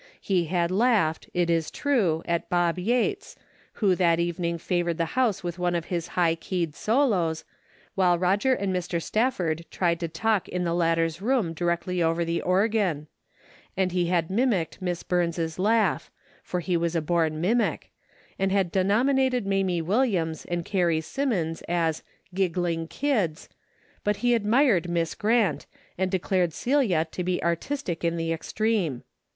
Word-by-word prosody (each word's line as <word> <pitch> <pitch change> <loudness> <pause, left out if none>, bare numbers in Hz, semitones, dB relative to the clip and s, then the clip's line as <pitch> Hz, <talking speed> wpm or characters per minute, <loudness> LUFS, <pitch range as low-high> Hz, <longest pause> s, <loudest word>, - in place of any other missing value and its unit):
He 180 -4 0
had 170 +1 0
laughed, 200 -6 +2
it 175 -1 +1
is 165 -2 +1
true, 205 - 0
at 170 -1 -2
Bob 175 0 +1
Yates, 250 - -1 0.4
who 200 -4 +2
that 170 -2 +2
evening 170 0 -1
favored 175 0 -1
the 165 -2 -2
house 245 -8 +1
with 175 0 -4
one 175 0 0
of 170 -1 -2
his 170 -2 -2
high 170 -2 +4
keyed 165 -1 -3
solos, 205 - +1 0.5
while 180 -2 +3
Eoger 200 +9 +2
and 195 -2 -1
Mr. 175 -1 -2
Stafford 175 -5 0
tried 170 -2 0
to 170 - -2
talk 205 +5 0
in 180 0 -2
the 170 -1 0
latter's 165 0 +1
room 225 -7 +1
directly 175 +2 -1
over 165 +1 +1
the 170 0 -1
organ; 185 -5 +1 0.7
and 190 -1 +1
he 175 -1 0
had 170 -1 0
mim 245 +7 +2
icked 180 -5 -2
Miss 175 -2 -3
Burns' 170 -2 -1
laugh 220 +3 +2 0.2
— - - -31
for 180 - -3
he 180 +1 -1
was 170 0 0
a 165 - +1
born 160 -1 0
mimic 225 +8 0 0.2
— - - -31
and 195 0 +1
had 190 -3 +1
denominated 250 +6 +2
Mamie 190 -3 0
Williams 185 - 0
and 175 -1 -3
Carrie 175 -5 +1
Simmons 175 - -2
as 165 -2 0 0.2
" - - -34
giggling 175 -3 -1
kids," 205 - -1 0.5
but 210 0 +1
he 245 - +4
admired 225 - +3
Miss 170 -1 0
Grant, 210 -9 +1 0.3
and 190 +1 0
declared 185 -2 0
Celia 235 - +1
to 180 - -4
be 180 0 -1
artistic 170 - -2
in 170 0 0
the 165 0 -1
extreme. 180 - -1
180 Hz, 165 wpm, -26 LUFS, 170-205 Hz, 0.7 s, high